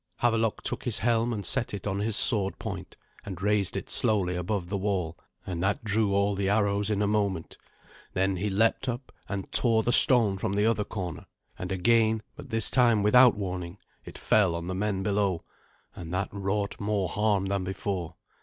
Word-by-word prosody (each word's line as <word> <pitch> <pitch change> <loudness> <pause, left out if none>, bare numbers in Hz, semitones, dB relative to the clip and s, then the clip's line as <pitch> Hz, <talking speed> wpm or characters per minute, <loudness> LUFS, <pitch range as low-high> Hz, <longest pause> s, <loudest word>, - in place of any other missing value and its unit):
Havelok 115 -2 +1
took - - -3
his 120 -4 0
helm, 115 +2 +1
and 105 -4 -4
set 115 +1 0
it 100 - -7
on 100 -1 -2
his 105 +1 -1
sword 100 -4 +1
point, - - -7 0.3
and 95 -3 -7
raised 100 -1 0
it - - -5
slowly 95 -5 +1
above 90 +1 -2
the 100 +2 -2
wall, 95 -4 -2 0.3
and 90 -3 -4
that 105 +7 0
drew 105 -1 +1
all 100 +1 +2
the 100 0 -1
arrows 100 0 +1
in 105 -1 0
a - - +1
moment. 100 -5 -1 0.6
Then 95 +1 0
he 105 +4 -1
leapt 110 +6 +1
up, 125 +2 -5 0.2
and 100 -2 -5
tore 115 -3 +3
the 120 - +1
stone 115 -6 +5
from 95 - -2
the 105 +1 +1
other 110 -2 +1
corner; 90 -6 -6 0.3
and 90 +1 -5
again, 110 +3 +2
but - - -11
this 115 0 +2
time 120 -5 +4
without 125 +3 +6
warning, 90 -2 -5 0.3
it - - -10
fell 95 -6 +2
on 85 0 -5
the 95 - -3
men 95 0 -1
below, 100 -4 0 0.5
and 85 -2 -8
that 95 +2 -1
wrought 100 +1 -2
more 100 -2 -1
harm 100 +1 0
than 100 -1 -1
before. 90 -3 -4
100 Hz, 190 wpm, -27 LUFS, 95-110 Hz, 0.6 s, without